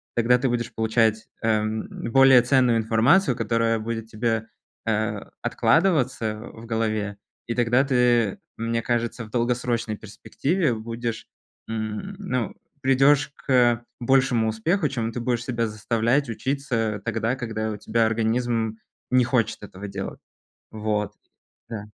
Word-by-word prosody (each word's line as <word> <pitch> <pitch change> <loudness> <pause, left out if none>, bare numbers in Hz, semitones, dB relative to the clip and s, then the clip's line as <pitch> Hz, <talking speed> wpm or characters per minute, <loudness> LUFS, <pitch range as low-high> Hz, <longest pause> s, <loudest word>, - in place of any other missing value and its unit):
Тогда 120 +1 +4
ты 130 - +1
будешь 120 -1 -2
получать, 110 -1 +1 0.2
э, 115 - +2
м, 110 +1 -3 0.2
более 135 -1 +7
ценную 125 -2 +3
информацию, 115 - +3
которая 115 0 +1
будет 115 0 -4
тебе, 115 0 -1 0.4
э, 110 -1 0 0.2
откладываться 135 - +2 0.2
в 115 - -11
голове, 110 -3 -1 0.3
и 115 - -2
тогда 120 +2 +3
ты, 120 -5 +2 0.2
мне 115 0 -1
кажется, 120 0 -1
в 110 - -15
долгосрочной 120 -2 -1
перспективе 135 - -1
будешь, 115 +1 -4 0.4
м, 110 - -4
ну 125 - -2 0.3
придешь 135 +2 +4 0.2
к 120 -2 +3 0.2
большему 120 -3 +3
успеху, 150 - 0
чем 115 -4 -2
ты 120 - -3
будешь 120 -1 -1
себя 115 -2 -1
заставлять 115 +5 0
учиться 115 -4 -2
тогда, 115 +2 0
когда 110 -3 -3
у 105 - -5
тебя 110 +2 +1
организм 115 0 0 0.3
не 125 -1 +5
хочет 120 -4 0
этого 100 0 -8
делать. - - -6 0.5
Вот, 105 -1 -2 0.6
да. 110 -3 -5
115 Hz, 130 wpm, -24 LUFS, 110-125 Hz, 0.6 s, более